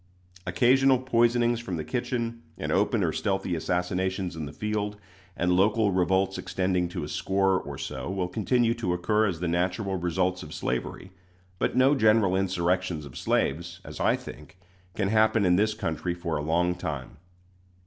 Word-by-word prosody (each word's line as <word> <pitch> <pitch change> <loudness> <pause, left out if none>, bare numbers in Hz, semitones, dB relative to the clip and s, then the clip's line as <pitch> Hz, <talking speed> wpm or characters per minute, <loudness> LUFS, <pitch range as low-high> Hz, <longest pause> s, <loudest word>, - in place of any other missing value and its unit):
Occasional 130 +9 +4
poisonings 120 -1 +2
from 95 -7 -4
the 80 - -3
kitchen 115 +3 -3 0.2
and - - -3
open - - +2
or - - +1
stealthy 95 -2 -1
assassinations 90 +2 -1
in 80 -2 -5
the - - -7
field, 105 -1 -3 0.4
and 90 +1 +1
local 105 +2 +3
revolts 95 +1 +1
extending 90 0 -1
to 90 -2 -4
a - - -4
score 95 +3 +1
or - - -7
so, - - -5
will 95 -2 -1
continue 115 +5 +1
to 115 -7 -2
occur 105 +5 +2
as 90 -4 -3
the 90 - 0
natural 90 +3 -1
results 90 +1 0
of - - -8
slavery; 95 - -3 0.5
but - - 0
no 130 +2 +5
general 110 -7 +4
insurrections 90 -3 0
of 70 - -12
slaves, 85 +1 -1
as - - -9
I - - +3
think, - - -11 0.4
can 100 -2 0
happen 110 0 +3
in 90 -1 +4
this 105 +3 +2
country 85 -2 -2
for 85 -2 -3
a 75 - -1
long 85 +4 +1
time. 75 -8 -6
95 Hz, 170 wpm, -27 LUFS, 90-110 Hz, 0.5 s, no